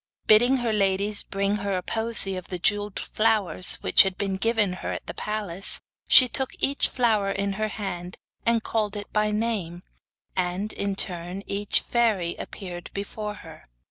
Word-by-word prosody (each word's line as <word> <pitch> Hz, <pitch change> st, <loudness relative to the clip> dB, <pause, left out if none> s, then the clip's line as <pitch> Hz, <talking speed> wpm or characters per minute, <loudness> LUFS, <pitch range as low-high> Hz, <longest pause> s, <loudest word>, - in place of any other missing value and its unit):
Bidding 245 Hz, +5 st, +5 dB
her 240 Hz, -3 st, -1 dB
ladies 200 Hz, 0 st, +1 dB
bring 200 Hz, +1 st, -1 dB
her 200 Hz, -1 st, -2 dB
the 180 Hz, -, -3 dB
posy 220 Hz, -2 st, 0 dB
of 185 Hz, -1 st, -7 dB
jewelled 205 Hz, +2 st, 0 dB
flowers 215 Hz, -5 st, +1 dB
which -, -, +6 dB
had 190 Hz, -2 st, +1 dB
been 195 Hz, -1 st, -2 dB
given 215 Hz, -2 st, +1 dB
her 185 Hz, -, -5 dB
at -, -, -6 dB
the -, -, -6 dB
palace, 205 Hz, -3 st, -1 dB, 0.3 s
she 255 Hz, -, +9 dB
took 265 Hz, +2 st, -2 dB
each 280 Hz, +1 st, +2 dB
flower 220 Hz, -5 st, +1 dB
in 195 Hz, 0 st, -1 dB
her 215 Hz, +2 st, -1 dB
hand 185 Hz, -4 st, -5 dB, 0.3 s
and 230 Hz, -1 st, +1 dB
called 215 Hz, -2 st, -1 dB
it 205 Hz, 0 st, -7 dB
by 210 Hz, 0 st, +2 dB
name, 210 Hz, -6 st, -2 dB, 0.5 s
and, 185 Hz, +3 st, -1 dB
in 200 Hz, -1 st, -2 dB
turn, 180 Hz, 0 st, -3 dB
each 205 Hz, +1 st, 0 dB
fairy 215 Hz, -8 st, 0 dB
appeared 175 Hz, -3 st, -7 dB
before 210 Hz, +1 st, -5 dB
her. -, -, -12 dB
205 Hz, 165 wpm, -25 LUFS, 190-215 Hz, 0.5 s, she